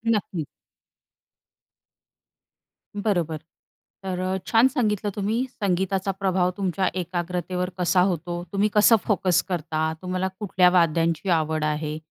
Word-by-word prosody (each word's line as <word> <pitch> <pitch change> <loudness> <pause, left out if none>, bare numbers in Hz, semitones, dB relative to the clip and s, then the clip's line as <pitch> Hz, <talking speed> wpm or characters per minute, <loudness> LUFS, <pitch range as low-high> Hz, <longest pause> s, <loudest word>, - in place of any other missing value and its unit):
नक्कीच. 180 -6 -3 2.6
बरोबर. 170 -7 0 0.7
तर 185 -1 -3
अ, 185 +1 -1
छान 230 +3 +5
सांगितलं 215 -6 0
तुम्ही 220 +5 0
संगीताचा 195 -1 -1
प्रभाव 185 -2 +1
तुमच्या 190 -1 0
एकाग्रतेवर 180 +1 -3
कसा 180 0 +3
होतो. 175 -1 -1
तुम्ही 205 +2 +2
कसं 215 +2 +6
फोकस 185 -4 +2
करता, 160 -2 -1
तुम्हाला 185 +1 -2
कुठल्या 185 -3 +3
वाद्यांची 170 0 +2
आवड 155 -2 +1
आहे. 150 0 -2
180 Hz, 110 wpm, -24 LUFS, 170-195 Hz, 2.6 s, कसं